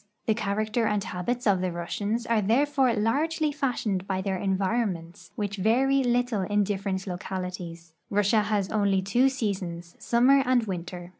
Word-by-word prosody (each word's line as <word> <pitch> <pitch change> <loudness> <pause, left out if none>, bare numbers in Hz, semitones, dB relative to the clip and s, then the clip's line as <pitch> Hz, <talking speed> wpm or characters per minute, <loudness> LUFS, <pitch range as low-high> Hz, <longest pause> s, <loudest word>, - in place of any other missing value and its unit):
The 220 - +3
char 200 -2 -2
acter 215 +2 0
and 210 -2 0
habits 240 +8 -3
of 195 -4 +3
the 185 -1 -1
Russians 205 +7 -3
are 230 -2 +2
therefore 260 +3 +2
largely 300 +8 +1
fashioned 235 -9 -2
by 190 -1 -1
their 195 -1 -1
environments, 190 -3 -2
which 205 -1 -3
vary 265 +7 +3
little 245 -3 +1
in 205 +2 +1
different 195 -1 -2
localities. 180 -3 -6 0.2
Russia 205 +2 +3
has 210 -2 -1
only 200 -3 +2
two 240 +8 +3
seasons, 185 -9 -4
summer 255 +4 +4
and 255 -2 +2
winter. 175 -2 -6
205 Hz, 155 wpm, -27 LUFS, 190-240 Hz, 0.2 s, summer